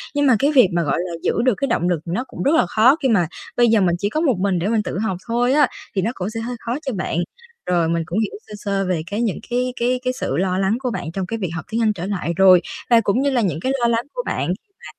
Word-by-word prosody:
Nhưng 290 0 +2
mà 250 - +6
cái 285 +2 +3
việc 255 -9 +6
mà, 170 -1 +1
gọi 140 - 0
là, 180 0 -3
giữ - - +1
được 255 - +4
cái 275 - -1
động 175 -6 0
lực 170 -3 +1
nó 185 +10 -2
cũng - - -6
rất 290 +4 +3
là 320 - +4
khó, 235 - +5
khi 265 - +3
mà 180 -7 +3 0.3
bây 240 -1 +5
giờ 220 -3 +4
mình 175 -2 +2
chỉ 205 - 0
có 310 - -1
một 270 -9 +2
mình 190 -2 +1
để 185 - -1
mình 220 -1 +1
tự - - -4
học 190 -5 -1
thôi 245 +3 +1
á, 295 -3 +5 0.3
thì 190 - +2
nó 225 +5 0
cũng 190 -2 -4
sẽ 225 0 -5
hơi 245 +2 -4
khó 235 - -3
cho 265 - -2
bạn. 185 -3 -2 0.5
Rồi 170 -2 +1
mình 165 -1 0
cũng 180 +7 -2
hiểu 220 - -1
sơ 210 - -11
sơ 200 -1 -1
về 170 -3 0
cái 215 +3 -1
những 220 -5 -1
cái 250 +1 -1
cái 250 +1 +1
cái 255 0 0
sự - - -3
lo 185 0 0
lắng 195 +4 +1
của 250 -2 -2
bạn 165 - -4
trong 190 +1 -3
cái 225 +4 -4
việc 185 -5 -2
học 160 - -5
tiếng 230 +1 0
Anh 215 -1 +3
trở 180 -2 -5
lại 185 -4 -2
rồi, 185 -2 +7 0.3
và 230 -1 +6
cũng 210 +5 +1
như 280 - +2
là 250 -3 +1
những 165 -6 -1
cái 260 - -1
lo 235 - +3
lắng 235 +1 0
của - - -3
bạn - - -2
khi 420 -3 -5
mà 485 - -15
215 Hz, 310 wpm, -21 LUFS, 185-245 Hz, 0.5 s, rồi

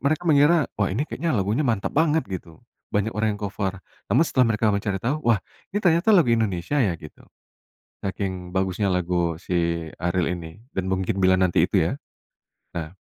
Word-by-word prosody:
mereka 155 +5 0
mengira, 150 0 +5
"Wah, 100 - +3
ini 125 +10 -1
kayaknya 165 -1 -2
lagunya 105 +9 +1
mantap 115 -7 0
banget," 160 -1 +3
gitu, 85 -4 -7 0.3
banyak 105 +2 0
orang 105 -1 0
yang - - -15
cover. 100 -1 -3 0.3
Namun, 155 +7 +5
setelah 125 -5 +3
mereka 105 -1 +2
mencari 100 -1 -1
tau, 130 +9 -1
"Wah, 115 -3 +3 0.3
ini 205 - -1
ternyata 175 +5 +4
lagu 165 - +5
Indonesia, 110 +5 0
ya? 90 -6 +1
Gitu, 75 - -13 0.8
saking 95 -2 -4
bagusnya 95 +1 0
lagu 85 -2 0
si 85 -2 -1
Ariel 90 0 0
ini, 80 +3 -10 0.2
Dan 95 -1 -1
Mungkin 95 +2 -1
Bila 95 0 +5
Nanti, 90 -2 +3
itu, - - +2
ya. - - -3 0.8
Ya. 80 0 -4
100 Hz, 175 wpm, -24 LUFS, 90-130 Hz, 0.8 s, mengira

